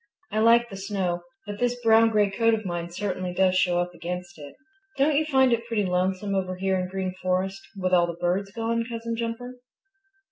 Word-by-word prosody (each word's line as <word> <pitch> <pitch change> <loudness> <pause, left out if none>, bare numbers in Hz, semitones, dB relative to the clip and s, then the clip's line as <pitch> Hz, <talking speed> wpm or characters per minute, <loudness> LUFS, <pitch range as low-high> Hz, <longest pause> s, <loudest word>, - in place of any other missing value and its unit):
"I 215 - 0
like 235 +2 +5
the 195 - -7
snow, 190 -3 -2 0.2
but 205 -1 -6
this 245 0 0
brown 225 0 +6
gray 210 -2 +2
coat 230 +2 +3
of 215 -1 -6
mine 175 -1 -3
certainly 185 -1 -3
does 185 0 +3
show 180 -1 +2
up 175 0 -2
against 175 0 -6
it. 145 -1 -10 0.4
Don't 285 +2 +3
you 310 +2 +2
find 265 -4 +4
it 235 0 -2
pretty 220 -4 0
lonesome 185 +2 0
over 185 -1 -1
here 190 +1 0
in 180 - -1
the - - -8
Green 190 -1 -3
Forest 185 +1 -1 0.2
with 185 -1 -1
all 175 -1 +5
the 170 - -3
birds 185 +3 -1
gone, 230 +1 -1
Cousin 230 0 -4
Jumper?" 235 +2 -5
195 Hz, 210 wpm, -25 LUFS, 180-230 Hz, 0.4 s, brown